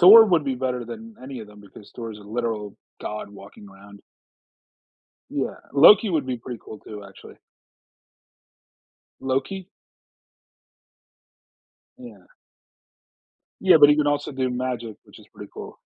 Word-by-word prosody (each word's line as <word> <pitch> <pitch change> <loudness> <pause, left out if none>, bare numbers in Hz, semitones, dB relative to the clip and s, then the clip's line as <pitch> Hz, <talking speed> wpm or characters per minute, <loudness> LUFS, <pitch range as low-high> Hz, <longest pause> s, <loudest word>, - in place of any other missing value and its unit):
Thor 220 +5 +10
would 175 -7 +2
be 135 -2 -1
better 125 -1 -3
than 225 - -10
any 130 -1 -7
of 110 - -9
them 105 0 -15
because 100 +1 -15
Thor's 115 -3 -7
a - - -13
literal 110 -1 -4 0.2
god 105 -1 -5
walking 100 0 -13
around. 100 +1 -15 1.3
Yeah, - - -3 0.2
Loki 195 +10 +7
would 160 -7 0
be 130 -1 -2
pretty 120 -1 -8
cool 110 - -10
too, 105 0 -10
actually. - - -15 1.8
Loki. 135 +9 -2 2.3
Yeah. 110 -7 -13 1.3
Yeah, 185 -3 +6
but 145 - +8
he 150 - +5
can 150 -1 +1
also 145 0 -1
do 130 -1 -1
magic, 125 -3 -4
which - - -16
is - - -17
pretty - - -11
cool. - - -10
125 Hz, 135 wpm, -24 LUFS, 105-145 Hz, 2.3 s, Thor